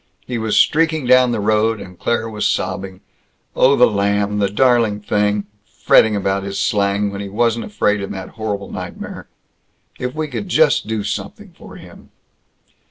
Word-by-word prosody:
He 125 -2 -4
was 110 -1 0
streaking 160 -2 +2
down 125 0 +5
the 115 - -1
road, 110 +1 +1
and 90 -2 -11
Claire 115 +3 -1
was 105 -1 -1
sobbing, 95 -1 -3 0.5
"Oh, 135 +2 +4
the 125 - +6
lamb, 100 0 0
the 100 -1 +1
darling 115 -1 +2
thing! 105 0 0 0.4
Fretting 110 -1 +5
about 100 -1 -1
his 100 0 -5
slang, 100 0 0
when 100 0 -6
he 100 - -6
wasn't 115 +2 0
afraid 105 - 0
in 100 - -5
that 95 -1 -7
horrible 105 -3 -5
nightmare. - - -7 0.7
If 125 +2 -4
we 155 0 -2
could 190 +6 -6
just 155 - +3
do 110 -2 -2
something - - -6
for - - -13
him!" - - -14
105 Hz, 165 wpm, -18 LUFS, 100-120 Hz, 0.7 s, the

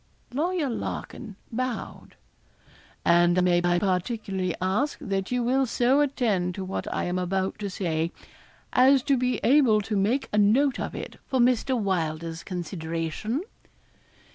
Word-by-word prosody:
Lawyer 325 +2 0
Larkin 220 -3 -5 0.2
bowed. 250 0 -4 0.9
'And 175 +1 +4
may 175 -1 +3
I 175 0 +3
particularly 190 -1 -1
ask 200 +11 0
that 195 -1 -3
you 250 -1 0
will 260 +2 +2
so 250 +5 +3
attend 215 -11 0
to 190 - -4
what 190 - -4
I - - -1
am 180 +1 -1
about 190 +2 -1
to 205 -1 -3
say, 170 -4 -1 0.6
as 260 +1 +5
to 280 - +3
be 250 0 0
able 255 -5 +5
to 210 +1 -3
make 220 +8 +1
a 210 - +3
note 250 +7 +3
of - - -4
it - - -7
for 260 - 0
Mr. 250 +1 +2
Welder's 165 -4 -2
consideration?' 175 - -3
205 Hz, 140 wpm, -26 LUFS, 180-255 Hz, 0.9 s, as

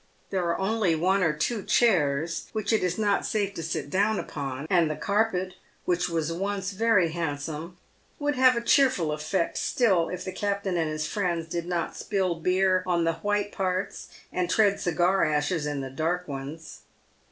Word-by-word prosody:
There 185 -2 0
are 170 - 0
only 195 -3 +1
one 190 +5 +2
or 165 -4 +3
two 200 +9 -1
chairs, 165 -9 +2
which 220 0 -1
it 220 - +3
is 180 -1 0
not 205 -2 +1
safe 200 -2 -1
to 170 - -5
sit 160 -3 -4
down 205 +3 +2
upon, 135 0 -5
and 170 -4 +3
the 155 - -2
carpet, 190 +1 0 0.3
which 180 0 +1
was 165 -1 -1
once 195 +1 -2
very 200 -4 +3
handsome, 160 +1 -4 0.4
would 290 0 0
have 255 0 +5
a 235 - -1
cheerful 235 - +3
effect 155 +4 -1
still 190 -9 +2
if 180 -1 -5
the 185 - -3
captain 200 -1 -2
and 165 -2 0
his 155 0 -2
friends 170 -2 -1
did 170 +1 -4
not 175 -2 -2
spill 190 -4 0
beer 185 +2 +2
on 175 -2 +2
the 165 0 +2
white 205 +3 -1
parts 185 0 -2 0.3
and 180 -1 -1
tread 200 0 +3
cigar 180 +2 +2
ashes 150 +1 0
in 145 -2 -2
the 135 -1 -6
dark 170 +6 -1
ones. 145 +3 -7
180 Hz, 180 wpm, -27 LUFS, 160-200 Hz, 0.4 s, have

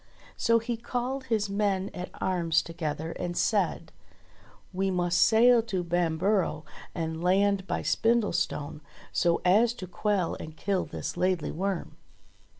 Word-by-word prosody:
So 230 -1 +3
he 230 +1 -2
called 250 +3 -3
his 220 -4 0
men 200 -1 0
at 180 - -6
arms 170 -4 +1
together 160 -1 -4
and 175 0 -4
said: - - 0 0.8
"We 190 +1 0
must 175 -1 +1
sail 235 +1 +6
to 190 -5 -3
Bamborough 175 0 0 0.3
and 160 0 -3
land 195 +1 +2
by - - -2
Spindlestone, 205 -10 0 0.3
so 170 -1 +1
as 220 +6 +4
to 185 - -7
quell 185 0 -1
and 155 0 -9
kill 195 -2 0
this - - -6
Laidly 180 -3 0
Worm." 190 +1 -3
185 Hz, 135 wpm, -28 LUFS, 170-215 Hz, 0.8 s, sail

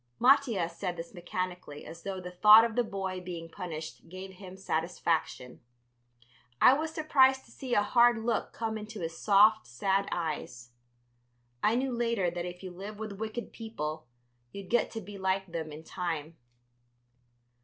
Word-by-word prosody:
Mattia 245 -8 +4
said 175 +1 -4
this 165 +3 -7
mechanically, 180 -4 -5
as 165 +1 -10
though 195 0 -4
the 180 0 -7
thought 210 +5 +8
of 230 -1 -3
the 245 - +3
boy 190 -3 -4
being 175 -2 -6
punished 165 -1 -7
gave 185 +2 -8
him 190 0 -11
satisfaction. 165 -7 -2 1.0
I 255 - +8
was 310 +3 -1
surprised 265 -4 +3
to 230 - -19
see 250 0 -3
a 205 - +4
hard 240 +1 +5
look 225 0 -1
come 220 -1 -3
into 215 -1 -8
his 165 0 -4
soft, 215 +3 +5
sad 190 +12 0
eyes. 145 -8 -4 0.9
I 220 - +3
knew 260 +1 0
later 230 -7 +1
that 175 0 -4
if 180 +1 -8
you 185 - -6
live 200 +4 -8
with 210 -2 -6
wicked 220 +2 -5
people 155 - -5 0.4
you 200 - -7
get 230 +5 +1
to 225 - -6
be 200 0 -9
like 190 0 0
them 165 -3 -5
in 155 +2 -9
time. 165 -3 -4
190 Hz, 165 wpm, -30 LUFS, 170-225 Hz, 1.0 s, thought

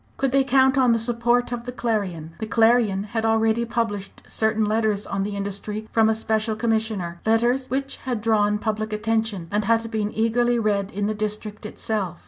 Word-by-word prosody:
Could 270 -1 0
they 275 +1 +4
count 265 +1 +3
on 250 -2 +4
the - - +2
support 240 +1 +1
of 240 -1 -4
the 250 - -4
Clarion? 195 -10 -2
The 220 - -3
Clarion 225 -3 +3
had 220 +2 -3
already 225 +1 +2
published 225 -4 -3
certain 220 0 +1
letters 215 -1 0
on 195 - -3
the 200 +1 -3
industry 200 +2 -4
from 220 -1 +4
a 220 - +2
Special 220 0 0
Commissioner 220 -6 -1
letters 240 +4 +2
which 270 +1 -2
had 250 -4 -3
drawn 210 -1 +2
public 215 0 -2
attention, 215 -4 -1
and 210 0 0
had 230 +1 +1
been 215 -2 -1
eagerly 240 +2 +1
read 205 -3 0
in 205 +1 -2
the 215 - 0
district 210 0 -4
itself. 200 -5 -3
220 Hz, 185 wpm, -23 LUFS, 210-235 Hz, -, they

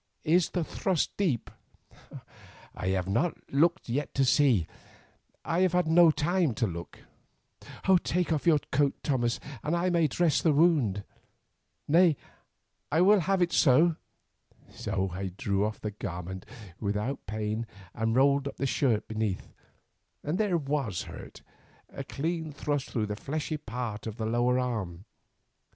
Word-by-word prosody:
Is 170 +2 +3
the 175 - -1
thrust 180 +1 -1
deep?" 160 - -1 1.2
"I 90 - -5
have 95 -1 0
not 130 - 0 0.2
looked 170 +5 +3 0.3
to 135 - +3
see. 125 - +4 0.8
I 165 +1 0
have 185 -1 +3
had 180 -1 +3
no 165 +1 +7
time 160 -3 +1
to 115 - +1
look." 85 -4 -7 1.0
"Take 175 -1 0
off 155 +2 -2
your 160 -3 +6
coat, 140 +1 +2
Thomas, 120 -4 0 0.2
that 155 +3 0
I 180 +1 +1
may 170 -2 +3
dress 165 +2 +1
the 160 - +3
wound. 140 - +3 0.8
Nay, 165 -1 +5 0.7
I 160 +4 +3
will 200 +3 +6
have 185 +2 +2
it 175 - -1
so." 160 +4 +5 0.8
So 95 -1 -2
I 95 0 -4
drew 100 -1 0
off 105 +1 -2
the 105 - -4
garment, 95 -2 -6
not 105 -8 -14
without 105 +6 -2
pain, 110 +2 -3 0.3
and 115 0 -1
rolled 140 +1 +3
up - - -7
the 135 - -1
shirt 125 -5 +1
beneath, 110 -3 -3 0.7
and 155 +5 -2
there 205 -5 +2
was 140 - -2
the - - -9
hurt, - - -11 0.5
a 140 - -6
clean 160 +3 -3
thrust 145 -1 -2
through 110 -4 -1
the 105 0 -4
fleshy 155 +6 -3
part 115 -5 -5
of 110 0 -6
the 110 - -3
lower 120 +2 +2
arm. 105 -8 -3
135 Hz, 150 wpm, -29 LUFS, 110-165 Hz, 1.2 s, no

